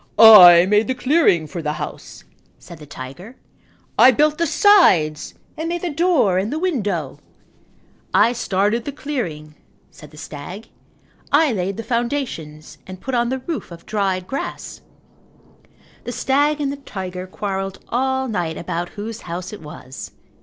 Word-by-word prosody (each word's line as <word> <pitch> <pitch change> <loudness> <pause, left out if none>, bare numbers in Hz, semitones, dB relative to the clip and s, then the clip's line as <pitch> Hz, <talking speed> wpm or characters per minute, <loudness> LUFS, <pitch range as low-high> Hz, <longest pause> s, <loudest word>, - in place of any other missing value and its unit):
"I 180 -6 +10
made 210 +3 +2
the 260 - -1
clearing 250 - +2
for 165 +3 -6
the 150 -1 -2
house," - - -8 0.3
said 170 - -13
the 150 - -12
tiger, 145 - -10 0.6
"I 255 - +9
built 300 +4 +2
the 335 - +1
sides 185 - +3 0.2
and 320 +2 -4
made 345 +1 -3
the 350 - -2
door 295 - +2
and 205 +5 -3
window." 205 - -2 0.9
"I 235 - +4
started 210 +1 -1
the 285 - -4
clearing," 200 - -5 0.4
said 150 - -14
the 150 - -17
stag. 180 +9 -9 0.6
"I 295 0 +4
laid 190 -1 -3
the 230 - -5
foundations 235 - -4
and 185 -1 -9
put 265 - -6
on 240 -1 +1
the 260 0 -4
roof 330 -3 -5
of 170 0 -12
dried 195 -4 -1
grass." 270 +8 -6 1.2
The 245 - -4
stag 290 +4 +1
and 280 -2 -1
the 280 - -6
tiger 185 -8 -7
quarrelled 195 0 -4
all 265 +2 -1
night 175 -8 -3
about 175 +1 -4
whose 220 +2 -6
house 180 +3 -6
it 210 - -9
was. 145 -3 -10
210 Hz, 155 wpm, -20 LUFS, 175-265 Hz, 1.2 s, I